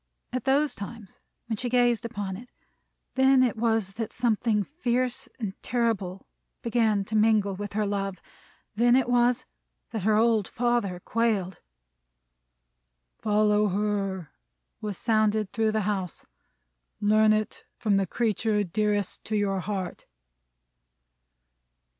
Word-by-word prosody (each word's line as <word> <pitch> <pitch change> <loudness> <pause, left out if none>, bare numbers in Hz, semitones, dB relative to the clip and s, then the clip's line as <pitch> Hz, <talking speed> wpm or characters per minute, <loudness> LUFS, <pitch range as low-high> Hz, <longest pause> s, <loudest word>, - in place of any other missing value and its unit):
At 255 -1 -2
those 280 +2 +3
times, 205 0 -9 0.2
when 225 -2 -3
she 245 +3 -2
gazed 240 -2 +2
upon 205 -5 -4
it, 245 +5 -11 0.6
then 265 0 +5
it 245 -4 +1
was 225 -3 0
that 225 - -2
something 225 -2 +1
fierce 255 - -2
and 210 -5 -3
terrible 215 -6 -1 0.4
began 220 -4 +1
to 220 - -4
mingle 215 -2 +3
with 205 +1 -6
her 210 0 0
love. 195 -1 -2 0.5
Then 240 +3 +4
it 260 -2 +3
was 245 0 +2 0.5
that 220 - -3
her 210 +3 +3
old 220 -2 +3
father 235 -7 0
quailed. 210 -6 -1 1.6
"Follow 210 0 +3
her!" 195 -3 -2 0.5
was 210 -3 -3
sounded 215 -2 +1
through 220 -1 +1
the 220 - +1
house. 190 -4 -3 0.7
"Learn 215 +1 +4
it, 215 0 -1
from 205 -3 +2
the 195 -1 +1
creature 215 0 0
dearest 205 +1 -1
to 215 - -2
your 200 -2 +1
heart!" 190 -1 -4
215 Hz, 125 wpm, -27 LUFS, 200-235 Hz, 1.6 s, then